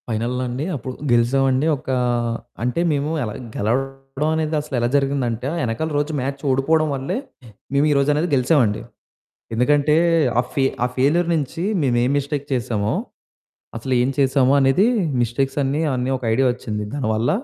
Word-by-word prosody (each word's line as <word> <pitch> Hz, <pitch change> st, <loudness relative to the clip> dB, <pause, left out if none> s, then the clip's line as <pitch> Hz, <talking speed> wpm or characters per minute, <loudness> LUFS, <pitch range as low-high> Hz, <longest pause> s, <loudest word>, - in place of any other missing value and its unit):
ఫైనల్లో 120 Hz, +3 st, -1 dB
అండి 130 Hz, +5 st, -3 dB
అప్పుడు 130 Hz, 0 st, -5 dB, 0.2 s
గెలిసామండి. 130 Hz, +3 st, +2 dB
ఒక్కా 130 Hz, 0 st, -2 dB, 0.7 s
అంటే 125 Hz, +7 st, 0 dB
మేము 145 Hz, 0 st, 0 dB
ఎలా 105 Hz, -3 st, -4 dB, 0.2 s
గెలవవడం 135 Hz, +5 st, -2 dB
అనేది 155 Hz, 0 st, -1 dB
అసలెలా 130 Hz, -5 st, -1 dB
జరిగిందంటే 135 Hz, -4 st, 0 dB
ఆ -, -, -3 dB
ఎనకాల 120 Hz, +8 st, -2 dB
రోజు 145 Hz, +2 st, 0 dB
మ్యాచ్ 135 Hz, +1 st, -4 dB
ఓడిపోవడం 155 Hz, +4 st, +2 dB
వల్లే 140 Hz, -, -3 dB, 0.6 s
మేమీరోజనేది 145 Hz, +3 st, +2 dB
గెలిసామండి. 125 Hz, -5 st, +2 dB, 0.7 s
ఎందుకంటే 145 Hz, +5 st, +3 dB, 0.4 s
ఆ -, -, +5 dB
ఫె 135 Hz, -, +2 dB, 0.2 s
ఆ -, -, +3 dB
ఫెయిల్యూర్ 160 Hz, +7 st, +2 dB
నించి 155 Hz, +2 st, -3 dB, 0.2 s
మేమేం 125 Hz, -1 st, +2 dB
మిస్టేక్ 145 Hz, 0 st, -2 dB
చేసామో. 115 Hz, -4 st, -1 dB, 0.8 s
అసలేం 125 Hz, +1 st, +1 dB
చేసామొ 135 Hz, -1 st, +3 dB
అనేది 135 Hz, +9 st, +4 dB, 0.4 s
మిస్టేక్సన్నీ 135 Hz, +4 st, 0 dB
అన్నీ 125 Hz, +1 st, -1 dB
ఒక 130 Hz, -, -14 dB
ఐడియా 130 Hz, +3 st, +3 dB
ఒచ్చింది. 105 Hz, -3 st, -5 dB
దానివల్ల. 115 Hz, -4 st, 0 dB
135 Hz, 130 wpm, -21 LUFS, 120-145 Hz, 0.8 s, ఆ